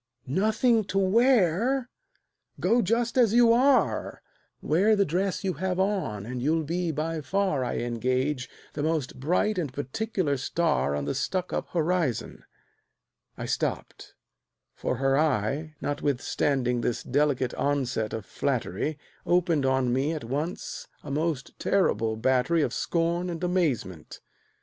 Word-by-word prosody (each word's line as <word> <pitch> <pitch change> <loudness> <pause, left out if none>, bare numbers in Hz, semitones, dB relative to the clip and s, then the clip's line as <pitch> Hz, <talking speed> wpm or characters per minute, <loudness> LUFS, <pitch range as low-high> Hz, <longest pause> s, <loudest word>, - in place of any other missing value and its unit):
"Nothing 220 - +2
to 195 - -3
wear! 230 +3 +3 0.7
Go 240 +2 +3
just 235 +4 +1
as 230 -3 +4
you 235 -1 +6
are; 265 +3 +2 0.4
Wear 200 +8 +3
the 200 -1 +3
dress 185 +5 -1
you 190 -1 0
have 185 +4 -2
on, 185 - -1
and 125 +1 -5
you'll 160 +4 +1
be 170 +3 -2
by 160 +1 -2
far, 185 -5 0
I 125 - -2
engage, 130 +3 -1 0.2
the 145 - -3
most 155 -5 -1
bright 180 +8 +1
and 150 -7 -2
particular 145 - -2
star 150 - 0
On 70 -1 -2
the 70 - -1
Stuckup 185 -1 -2
horizon 165 - -1 0.4
" - - -51
I - - -4
stopped, - - -3 0.6
for - - -2
her 135 +2 +2
eye, 150 +2 0
Notwithstanding 135 -3 0
this 120 - -1
delicate 135 -2 +1
onset 130 -6 -1
of 110 -3 -5
flattery, 135 - -2 0.3
Opened 170 -6 +2
on 130 -2 +2
me 140 +5 +1
at 155 - -5
once 145 +9 -4 0.2
a 145 - -7
most 150 -2 -2
terrible 115 - +1
battery 130 +7 +2
Of - - -1
scorn 170 +1 0
and 170 0 -5
amazement. 145 - -1
155 Hz, 135 wpm, -27 LUFS, 130-185 Hz, 0.7 s, you